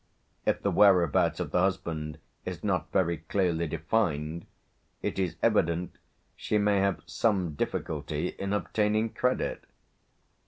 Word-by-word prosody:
If - - +1
the - - +2
whereabouts 90 -7 +4
of - - -3
the - - +2
husband 80 -5 -1 0.3
is 90 -2 -6
not 90 -4 -1
very 85 -3 +2
clearly 85 0 0
defined, 80 -1 -1 0.6
it - - -2
is 90 -3 0
evident 85 +1 +1 0.4
she 105 - 0
may 105 -1 +3
have 100 -1 0
some 95 -8 0
difficulty 70 - -2
in 100 0 -5
obtaining 105 +2 +1
credit. 125 +3 -1
90 Hz, 125 wpm, -29 LUFS, 80-100 Hz, 0.6 s, whereabouts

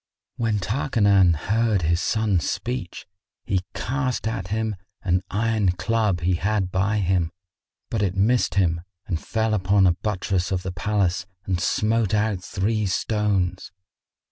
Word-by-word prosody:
When 115 -3 0
Tarkanan 100 - +3
heard 110 +3 +1
his 85 +2 +2
son's 105 -7 +1
speech, 120 -7 -4 0.4
he 95 -2 0
cast 130 -2 -1
at 100 -5 -3
him 110 +1 -1 0.3
an 90 -1 +2
iron 105 -3 +1
club 105 -3 0
he 90 +2 +2
had 95 +1 0
by 100 +3 +1
him; 90 -4 +1 0.6
but 110 - 0
it 95 -2 0
missed 105 -1 +2
him 85 -4 +2 0.2
and 85 -2 -3
fell 110 -1 0
upon 100 -1 +3
a 90 - +5
buttress 95 -1 -2
of 90 -1 -1
the 95 - -3
palace 95 0 0 0.2
and 90 -3 -1
smote 110 -1 +1
out 105 -3 0
three 105 +4 -1
stones. 95 -2 0
100 Hz, 140 wpm, -24 LUFS, 90-110 Hz, 0.6 s, a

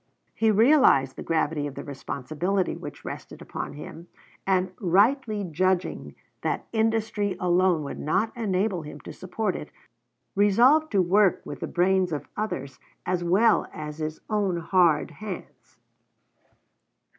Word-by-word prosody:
He 225 - +2
realized 215 - +5
the - - -7
gravity 155 -2 0
of 140 - -8
the - - -6
responsibility 155 +7 -2
which - - -9
rested - - -7
upon - - -6
him, 160 +3 -10 0.4
and 185 -1 +2
rightly 210 +4 +2
judging 185 +2 -1 0.3
that - - -2
industry 220 -3 0
alone 180 -2 +2
would 140 - -6
not 195 +9 0
enable 195 -4 0
him 150 -1 -9
to - - -9
support 185 +2 -3
it, 150 - -7 0.7
resolved 245 +11 +4
to 195 -2 +4
work 195 +2 +3
with - - -7
the - - -4
brains 185 0 +2
of 150 - -4
others 140 -11 -4 0.3
as 180 -1 -1
well 205 +6 +3
as 150 0 -7
his 155 0 -4
own 205 -5 0
hard 170 -2 +2
hands. 195 +4 -9
185 Hz, 135 wpm, -26 LUFS, 160-210 Hz, 0.7 s, realized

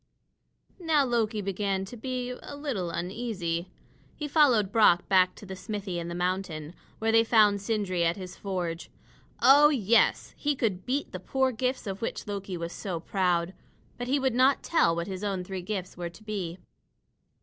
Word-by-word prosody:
Now 315 -5 +3
Loki 225 -3 0
began 195 0 -1
to 215 - -9
be 250 +1 -4
a 250 +3 -8
little 265 - -3
uneasy. 180 -1 -3 0.5
He 300 - -4
followed 255 -10 +4
Brock 210 -6 +4
back 185 -2 +4
to - - -12
the 190 -1 -7
smithy 195 -2 -4
in 170 - -5
the 170 - -5
mountain, 175 -3 -2 0.2
where 225 0 +1
they 225 0 +6
found 210 -3 +4
Sindri 200 -4 -1
at 170 +2 +1
his 185 -2 -8
forge. 180 -4 -4 0.5
Oh, 290 +2 +8
yes! 235 -5 +2
He 295 -1 0
could 205 -8 -2
beat 275 +3 -1
the 185 - -5
poor 265 +7 0
gifts 255 +2 -2
of 195 -1 -5
which 230 - -3
Loki 200 -3 -4
was 170 0 -5
so 185 -5 -4
proud. 180 0 0 0.5
But 245 - -3
he 275 +3 +2
would 265 -3 +1
not 260 +3 +3
tell 170 - +3
what 170 0 -2
his 190 +1 -6
own 195 -3 -1
three 190 0 -5
gifts 185 -1 -4
were 175 -1 -4
to 175 +6 -16
be. 190 -5 -4
200 Hz, 180 wpm, -28 LUFS, 180-245 Hz, 0.5 s, Oh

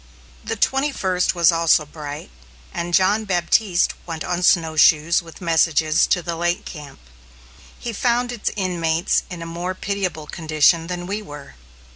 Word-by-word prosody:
The 225 - -3
twenty 270 +6 +1
first 185 -7 0
was 170 0 +5
also 165 -2 +3
bright, 145 - -8 0.4
and 170 +1 -4
John 200 +3 +3
Baptiste 185 0 +1
went 165 -2 -5
on 180 0 -2
snowshoes 160 -2 +4
with 165 +1 -14
messages 160 -2 +2
to 180 - +1
the 170 0 -3
lake 175 +1 -1
camp. 150 -4 -10 0.8
He 235 - -6
found 245 +2 0
its 235 -3 -2
inmates 175 -3 0
in 175 -3 -7
a - - -7
more 175 +2 -4
pitiable 190 -6 -3
condition 160 +1 +1
than 175 0 -5
we 205 +3 -3
were. 145 -7 -11
175 Hz, 150 wpm, -21 LUFS, 160-190 Hz, 0.8 s, was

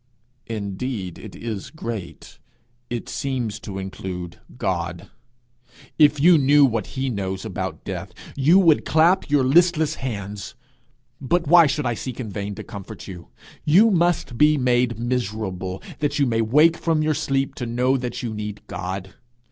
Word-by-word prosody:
'Indeed 100 -2 -4
it - - -10
is 110 -4 -5
great! 115 - -7 0.5
it 120 -1 -4
seems 125 -5 -3
to 100 -5 -7
include 95 -2 -6 0.2
God! 90 -4 -3 0.9
If 150 -1 +5
you 165 +2 +6
knew 145 +1 +6
what 115 -5 -1
he 135 +1 0
knows 95 -2 -4
about 95 -6 -5
death - - -5 0.2
you 145 +7 +5
would 165 -6 +5
clap 165 +4 +3
your 145 -2 +3
listless 160 +3 +3
hands. 100 -5 -5 0.7
But 170 +6 +1
why 170 +1 +7
should 150 0 -1
I 120 - +1
seek 125 +2 -6
in 110 -5 -5
vain 100 0 -4
to - - -7
comfort 100 -2 -9
you? 90 -3 -9 0.4
You 200 +9 +5
must 175 - +1
be 150 0 +5
made 125 -2 +1
miserable, 105 -6 -3 0.2
that 145 -2 0
you 140 - +3
may 115 -3 +1
wake 150 +9 +4
from 160 -2 +1
your 155 0 +2
sleep 135 -3 -1
to 120 - -2
know 125 +3 +1
that 125 -1 -4
you 115 -2 -3
need 105 -1 -6
God. 95 +1 -5
120 Hz, 155 wpm, -23 LUFS, 100-150 Hz, 0.9 s, why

